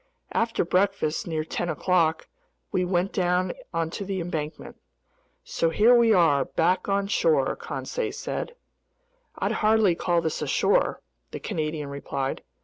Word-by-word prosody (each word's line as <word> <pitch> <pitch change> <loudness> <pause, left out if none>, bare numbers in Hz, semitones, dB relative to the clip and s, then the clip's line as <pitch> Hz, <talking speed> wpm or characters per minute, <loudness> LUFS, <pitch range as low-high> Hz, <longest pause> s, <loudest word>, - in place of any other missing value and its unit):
After 230 -5 0
breakfast 180 -3 0
near 160 -2 -1
ten 175 +2 -3
o'clock, 160 0 +1 0.4
we 185 - +1
went 180 +1 0
down 180 -1 +1 0.2
onto 165 +3 -2
the 195 -1 -3
embankment. 160 -3 -5 0.7
"So 165 - 0
here 215 +8 +5
we 235 -1 +5
are, 165 -8 +4
back 180 +4 0
on 200 0 +1
shore," 465 - +2
Conseil 485 -3 -4
said. 480 - -5 0.8
"I'd - - -1
hardly 215 -3 +3
call 175 0 +1
this 160 -1 -2
shore," - - +2 0.3
the - - -6
Canadian 155 -2 -3
replied. 140 -1 -3
175 Hz, 135 wpm, -26 LUFS, 160-200 Hz, 0.8 s, here